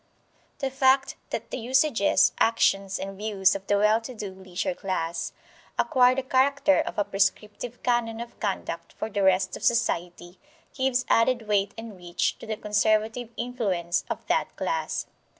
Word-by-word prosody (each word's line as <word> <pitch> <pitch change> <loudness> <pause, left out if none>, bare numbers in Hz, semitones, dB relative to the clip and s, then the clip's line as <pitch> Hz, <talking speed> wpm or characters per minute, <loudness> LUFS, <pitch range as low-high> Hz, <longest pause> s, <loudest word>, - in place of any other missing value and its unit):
The 270 -1 -2
fact 265 +1 +3
that - - -5
the - - -3
usages, 255 -2 +3
actions, 195 -4 +2
and 195 0 -6
views 200 -2 +2
of 195 0 -6
the 205 - +3
well 210 +2 +3
to 250 +2 -8
do 205 -3 -5
leisure 190 +8 -4
class 170 -7 -3 0.5
acquire 250 -1 +4
the 265 - -1
character 280 +2 +3
of - - -3
a 205 - +3
prescriptive 205 +4 -2
canon 235 -2 0
of 235 0 -8
conduct 170 -4 -4
for 220 - -5
the 200 - -1
rest 190 -1 +3
of - - -9
society, 175 -6 -1 0.3
gives 260 -2 0
added 230 -1 +2
weight 200 -1 +1
and 225 -2 -8
reach 175 0 -1
to - - -10
the 220 -1 -3
conservative 215 +3 +1
influence 200 -8 -1
of - - -4
that - - 0
class. - - -2
215 Hz, 160 wpm, -26 LUFS, 195-245 Hz, 0.5 s, acquire